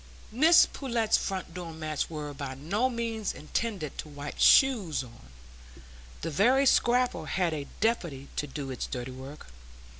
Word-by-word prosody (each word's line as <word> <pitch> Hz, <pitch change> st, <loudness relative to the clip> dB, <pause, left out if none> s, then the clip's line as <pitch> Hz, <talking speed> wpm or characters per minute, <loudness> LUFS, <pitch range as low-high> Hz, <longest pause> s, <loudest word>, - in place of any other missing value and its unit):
Mrs 320 Hz, +8 st, +6 dB
Pullet's 235 Hz, -5 st, 0 dB
front 190 Hz, -3 st, -3 dB
door 175 Hz, -2 st, -6 dB
mats 155 Hz, -2 st, -3 dB
were 150 Hz, -2 st, -5 dB
by 135 Hz, -1 st, -6 dB
no 200 Hz, -, 0 dB
means 230 Hz, -3 st, -3 dB
intended 180 Hz, -, -4 dB
to 155 Hz, -, -6 dB
wipe 145 Hz, 0 st, -8 dB
shoes 210 Hz, -, +5 dB
on; 115 Hz, -, -15 dB, 0.9 s
the 165 Hz, -, -3 dB
very 250 Hz, -, +4 dB
scraper 245 Hz, -, +2 dB
had 175 Hz, -1 st, 0 dB
a 145 Hz, -2 st, -4 dB
deputy 170 Hz, -, -1 dB
to 150 Hz, -, -2 dB
do 140 Hz, -1 st, -6 dB
its 125 Hz, -, -4 dB
dirty 125 Hz, +1 st, -5 dB
work. 130 Hz, -, -10 dB
165 Hz, 150 wpm, -28 LUFS, 145-230 Hz, 0.9 s, Mrs